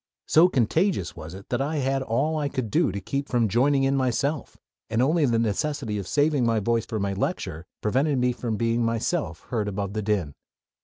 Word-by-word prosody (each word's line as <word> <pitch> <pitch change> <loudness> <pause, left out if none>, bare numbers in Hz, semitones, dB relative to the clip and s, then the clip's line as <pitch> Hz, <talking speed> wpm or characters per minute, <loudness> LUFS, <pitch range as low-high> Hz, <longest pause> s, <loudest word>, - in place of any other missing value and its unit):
So 170 +4 +6
contagious 145 - +1
was 80 +3 -8
it 95 - -12
that 120 - 0
I 150 +3 -1
had 135 -1 0
all 135 +6 0
I 150 -2 -1
could 125 -6 -3
do - - +2
to 100 - -4
keep 140 +8 -3
from 120 -3 +2
joining 135 +6 +3
in 135 +1 +2
myself 135 +3 -1 0.3
and 115 +1 0
only 150 +4 +3
the 115 -2 +2
necessity 115 0 -1
of 95 - -6
saving 145 -2 +2
my 115 -1 +2
voice 115 +2 0
for 110 - -3
my 100 0 -1
lecture 95 - -3
prevented 135 +6 +1
me 125 0 +2
from 115 -3 -3
being 115 +1 +1
myself 115 +8 -1
heard 110 -4 0
above 100 -1 -3
the 110 - -2
din. 100 -8 -1
120 Hz, 205 wpm, -25 LUFS, 105-140 Hz, 0.3 s, So